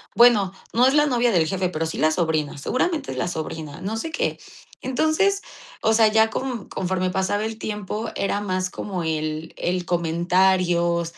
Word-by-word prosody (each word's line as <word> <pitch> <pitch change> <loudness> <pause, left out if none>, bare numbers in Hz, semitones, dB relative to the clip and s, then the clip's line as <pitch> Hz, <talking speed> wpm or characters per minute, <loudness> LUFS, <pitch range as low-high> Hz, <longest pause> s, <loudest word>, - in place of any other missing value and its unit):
"Bueno, 220 -6 +5 0.2
no 245 +2 +4
es 265 - +4
la 295 0 +4
novia 245 -3 +2
del 170 -5 +3
jefe, 185 +1 -1
pero 165 -2 -2
sí 160 - -5
la 155 - +3
sobrina, 155 -3 -1
seguramente 295 - -1
es - - -6
la - - -1
sobrina, 160 -3 -5
no 210 +4 -3
sé 320 +8 -4
qué". 325 - -1 0.4
Entonces, 315 +10 +1 0.4
o 220 - +3
sea, 220 0 +5
ya 220 +1 +4
co 245 -2 -4
conforme 185 0 -1
pasaba 190 +3 0
el 220 0 -4
tiempo, 210 +1 -4
era 200 +1 0
más 185 -2 -1
como 185 -2 -4
el 155 0 -3
el 180 0 -1
comentario, 175 0 +2
190 Hz, 175 wpm, -23 LUFS, 170-225 Hz, 0.4 s, Bueno